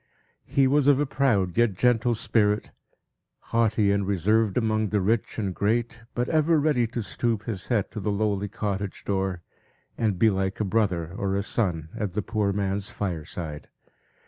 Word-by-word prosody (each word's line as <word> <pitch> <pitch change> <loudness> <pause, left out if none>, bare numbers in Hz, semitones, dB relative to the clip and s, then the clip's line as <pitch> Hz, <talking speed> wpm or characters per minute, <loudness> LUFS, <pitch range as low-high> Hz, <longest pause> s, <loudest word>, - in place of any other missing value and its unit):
He 135 - +3
was 140 +1 +3
of 140 -2 +5
a 145 - +2
proud, 120 -10 +1
yet 120 -5 +3
gentle 120 +2 +2
spirit, 105 -2 +1 0.8
haughty 110 -3 +3
and 100 -1 0
reserved 100 +2 +2
among 110 -2 +1
the 105 - +1
rich 110 +4 0
and 100 -4 -2
great; 115 +4 -1
but 120 0 0
ever 160 0 +3
ready 140 -6 +2
to 115 0 -4
stoop 115 0 -1
his 105 -6 -5
head 115 -6 0
to - - -5
the 105 - -2
lowly 100 -1 0
cottage 100 -1 -4
door, 95 -3 -1 0.6
and 110 -5 +1
be 110 +3 +4
like 95 0 -2
a 105 - 0
brother 95 -5 0
or 100 -1 -1
a 100 - 0
son 85 -8 -1
at 105 -5 -3
the 105 +1 -1
poor 105 -1 0
man's 100 +1 -2
fireside. 85 -7 -5
105 Hz, 170 wpm, -26 LUFS, 95-115 Hz, 0.8 s, of